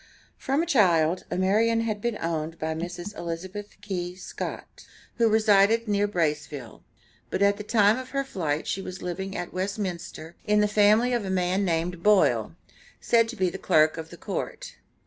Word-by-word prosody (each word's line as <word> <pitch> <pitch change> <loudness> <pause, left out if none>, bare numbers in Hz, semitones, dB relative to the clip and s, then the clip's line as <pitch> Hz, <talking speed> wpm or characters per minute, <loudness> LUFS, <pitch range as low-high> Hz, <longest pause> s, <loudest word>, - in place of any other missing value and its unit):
From 275 +5 0
a - - -2
child, 180 - +3
Amarian 220 +5 +2
had 215 -2 -2
been 235 -2 -1
owned 165 0 -3
by 160 0 -2
Mrs. 175 +4 -6
Elizabeth 185 +5 -6
Key 180 -3 -4
Scott, 185 - -7 0.3
who 230 -1 +4
resided 215 +1 +4
near 205 0 +2
Braceville, 150 - -3 0.5
but 200 - 0
at 200 0 +3
the 210 - -6
time 210 +1 +3
of 260 0 -8
her 275 0 -1
flight 160 - -2
she 195 - -2
was 185 -1 -8
living 190 +2 -4
at 175 - -5
Westminster, 185 -4 -4
in 210 -1 +2
the 210 - +4
family 215 +4 +4
of 240 -3 0
a 195 - -4
man 185 +1 +1
named 170 -1 -1
"Boile," 210 0 +3 0.4
said 230 -1 +3
to 240 - -6
be 185 -5 0
the 190 - -7
clerk 155 -3 +3
of 160 0 -6
the 170 - -11
court. - - -5
190 Hz, 175 wpm, -26 LUFS, 170-210 Hz, 0.5 s, who